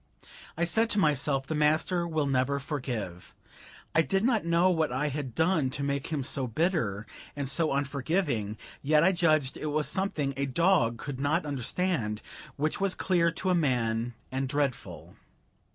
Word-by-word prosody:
I 170 - +2
said 225 +7 +2
to 210 - +1
myself, 140 -4 +1
the 160 - -3
master 155 +4 +2
will 155 -3 0
never 135 0 +1
forgive. 120 - -5 0.6
I 165 - +5
did 195 +4 0
not 230 -3 +2
know 170 +2 +3
what 160 -5 +1
I 140 +4 0
had 135 -4 -5
done 160 -4 +2
to 140 +2 -3
make 140 -1 -1
him 150 -4 -2
so 130 0 -1
bitter 115 - 0 0.3
and 140 -1 -3
so 155 +3 +1
unforgiving, 140 - -1 0.2
yet 150 +2 +3
I 190 - +5
judged 155 -7 +1
it 155 - -4
was 150 0 0
something 155 -8 -1
a 140 +1 -1
dog 155 -5 +2
could 130 +2 -6
not 155 +5 +1
understand, 135 - -1
but - - -14
which 155 +5 -1
was 195 -2 +1
clear 175 -3 +2
to 185 +3 0
a - - +4
man 120 -7 0 0.2
and 130 0 -2
dreadful. 140 -3 -3
145 Hz, 170 wpm, -28 LUFS, 130-170 Hz, 0.6 s, I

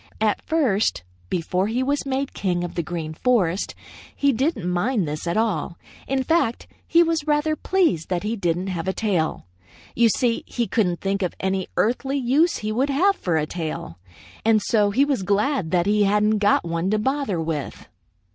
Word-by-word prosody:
At 215 -1 +1
first, 245 - +1 0.3
before 180 +3 0
he 240 +4 0
was 280 +1 -1
made 270 +1 -2
king 175 -3 -1
of 175 - -5
the 170 - -1
Green 160 -1 -5
Forest, 195 -3 +1 0.4
he 280 -1 +2
didn't 245 - -1
mind 180 +2 0
this 150 +3 -4
at 170 - 0
all. 190 -7 -1 0.3
In 265 0 0
fact, 320 -7 +1 0.2
he 335 +1 +5
was 325 -2 -1
rather 300 +1 +2
pleased 330 - +1
that 180 0 -1
he 215 +2 -1
didn't 180 -3 -1
have 180 -3 -4
a 190 - +1
tail. 185 - -1 0.5
You 235 0 +4
see, 230 +1 0
he 240 - -1
couldn't 180 -7 0
think 195 0 -1
of 180 - -2
any 190 -1 -1
earthly 265 +5 +1
use 280 +6 +2
he 215 0 -3
would 260 +6 0
have 370 +9 +3
for 175 - -1
a 150 - +1
tail, 155 - -5 0.4
and 220 -1 +4
so 210 -1 +2
he 265 +8 +3
was 275 -7 0
glad 200 - 0
that 175 -1 +2
he 210 +1 +2
hadn't 210 +1 +2
got 205 -3 +3
one 170 +2 -1
to 215 - +2
bother 265 - -1
with. 160 -3 -4
210 Hz, 185 wpm, -23 LUFS, 175-265 Hz, 0.5 s, he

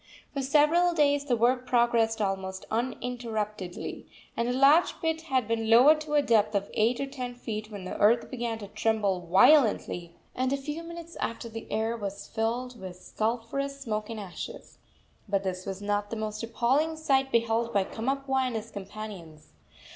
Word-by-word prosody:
For 280 - -2
several 310 +6 +3
days 285 -2 +3
the 255 -4 +2
work 250 +2 +2
progressed 230 -2 +2
almost 190 -1 -3
uninterruptedly, 225 -5 -3 0.3
and 235 +1 0
a - - +1
large 275 +6 +4
pit 320 -1 -1
had 260 -5 +1
been 225 -1 -1
lowered 280 +7 +7
to 300 -1 -3
a 290 - +4
depth 215 -4 +3
of 200 0 -1
eight 230 +3 +2
or 275 - -1
ten 255 -3 -6
feet, 215 -3 -5
when 205 -3 -8
the 185 - -5
earth 230 +3 +3
began 235 -3 -3
to 205 -2 -8
tremble 210 -4 0
violently, 190 - +4 0.2
and 255 +1 -1
a 280 - +1
few 295 +4 -5
minutes 335 0 -9
after 230 0 -4
the 225 0 -8
air 225 +1 0
was 200 -2 -5
filled 240 +2 -2
with 185 -1 -7
sulphurous 235 +8 -3
smoke 215 -5 -3
and 225 -1 -5
ashes. 205 - -8 0.5
But 195 -1 +1
this 185 0 -4
was 195 +1 -5
not 205 0 -1
the 230 - -4
most 215 -1 -4
appalling 260 +8 +1
sight 270 -3 +1
beheld 230 0 +1
by 200 -3 +2
Kamapuaa 265 +4 -1
and 245 - -4
his 225 +1 -5
companions. 195 - -9
230 Hz, 175 wpm, -28 LUFS, 210-270 Hz, 0.5 s, lowered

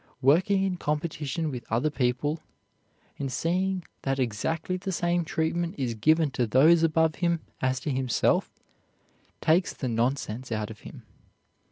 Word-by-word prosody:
Working 185 +8 +4
in 190 -2 -1
competition 150 0 -2
with 125 -2 -6
other 125 +7 +1
people, 135 +3 0 0.8
and 135 -2 -2
seeing 185 +5 0 0.2
that 135 0 -1
exactly 135 - -1
the 185 +1 -4
same 175 -1 +1
treatment 165 +3 -1
is 125 -4 -1
given 155 +7 +3
to 125 -2 0
those 155 +9 +5
above 160 -1 +2
him 170 -2 +1 0.2
as 130 0 +1
to 150 - -2
himself, 130 -2 +1 0.9
takes 165 +3 +3
the 130 - -3
nonsense 120 0 -1
out 110 -1 -2
of 110 - -11
him. - - -11
150 Hz, 145 wpm, -27 LUFS, 130-170 Hz, 0.9 s, those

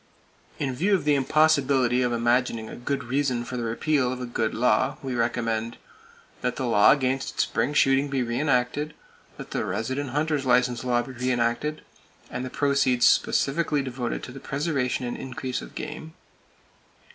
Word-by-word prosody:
In 135 -3 -2
view 190 +10 +2
of 175 - -2
the 150 - +4
impossibility 140 -3 +3
of 125 -1 +1
imagining 120 -1 +1
a - - -8
good 135 +2 -3
reason 125 -1 -1
for 125 - -6
the 120 - -2
repeal 125 +3 0
of 130 - -5
a 125 - -4
good 115 -2 -2
law, 115 -2 +2
we 130 -1 -3
recommend: 115 -1 -1 0.6
That 125 -1 -1
the 130 - -3
law 105 -4 +5
against 135 -1 +1
spring 145 - 0
shooting 135 0 +4
be 135 -2 -1
re 120 +1 -2
enacted. 145 +2 0 0.4
That - - -9
the - - -1
resident 130 +6 -2
hunter's 150 +1 0
license 125 -1 +2
law 120 -1 +1
be 130 - -9
re 125 0 -2
enacted, 120 +6 -1 0.5
and 125 - -4
the 130 - -4
proceeds 140 -3 +2
specifically 145 0 +2
devoted 125 -2 -4
to - - -7
the 135 - -9
preservation 135 -3 -1
and 120 - -3
increase 130 -1 -4
of - - -11
game. 160 +1 -7
130 Hz, 170 wpm, -25 LUFS, 120-140 Hz, 0.6 s, law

